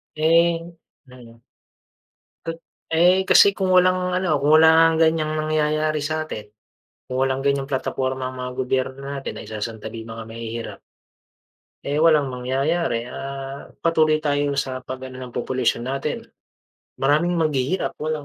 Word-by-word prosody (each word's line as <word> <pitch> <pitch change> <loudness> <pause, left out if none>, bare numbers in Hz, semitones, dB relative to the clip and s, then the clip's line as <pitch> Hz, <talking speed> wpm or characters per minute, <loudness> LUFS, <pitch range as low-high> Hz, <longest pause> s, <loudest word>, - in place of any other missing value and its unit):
Eh 165 +2 +3 0.5
mm. 120 -2 -15 1.0
Ka 165 - -1 0.4
eh, 180 +3 +5
kasi - - +8
kung 190 -1 0
walang 185 0 +4 0.2
ano, 185 -2 -1
kung 145 +2 +2
wala 160 0 +7
ngang 165 0 +5
ganiyang 160 -1 +1
nangyayari 155 0 0
sa'tin. 155 -9 -4 0.6
Kung 130 - -5
walang 135 0 0
ganyang 140 0 +1
plataporma 130 0 -2
ang 130 - -6
mga 125 0 -4
gobyerno 130 +1 -1
natin, 140 -1 -5
naisasantabi 110 +1 -6
'yong 115 - -11
mga 115 - -7
mahihirap. 115 0 -6 1.1
Eh, 145 +2 0
walang 155 -3 +5
mangyayari, 130 0 -1
ah, 135 +2 -7 0.2
patuloy 155 -2 +3
tayo 145 -2 -1
sa 130 -1 -2
pag-ano 130 0 -8
ng 125 - -7
population 125 -1 -1
natin. 135 +1 -3 0.7
Maraming 155 +6 +2
maghihirap, 155 +1 0
walang 155 -1 -3
140 Hz, 130 wpm, -22 LUFS, 130-155 Hz, 1.1 s, kasi